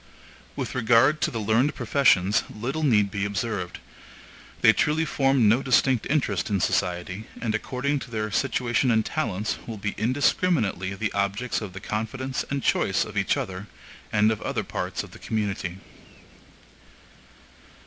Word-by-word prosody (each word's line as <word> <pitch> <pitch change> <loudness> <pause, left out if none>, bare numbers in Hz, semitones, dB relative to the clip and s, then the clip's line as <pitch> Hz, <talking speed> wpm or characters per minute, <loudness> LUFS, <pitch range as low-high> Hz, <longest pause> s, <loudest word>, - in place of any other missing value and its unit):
With - - -4
regard 125 +5 +4
to - - +2
the 115 - -5
learned 115 +7 +2
professions, 105 -8 +3
little 130 +9 -4
need 105 -9 +3
be 100 -2 -2
observed; 100 -3 -3 0.8
they 110 - +7
truly 160 +5 +1
form 135 -6 +2
no 115 +5 +4
distinct 130 -2 +2
interest 150 -6 0
in 100 -2 +1
society, 95 +2 -1
and 115 -2 -1
according 130 +6 -1
to 135 - -9
their 110 -2 -3
situation 125 0 +1
and 110 -2 +3
talents, 110 - -2
will 115 -2 -5
be 100 0 -3
indiscriminately 115 - +1
the 110 +1 -2
objects 100 +6 -1
of 100 -4 -6
the 95 - -7
confidence 120 +6 -3
and 140 -1 -2
choice - - +2
of - - -10
each - - +1
other, 95 +2 -5 0.4
and 105 +1 +4
of 110 - -3
other - - -2
parts - - -4
of - - -12
the - - -13
community. 100 -5 -3
110 Hz, 150 wpm, -25 LUFS, 100-130 Hz, 0.8 s, they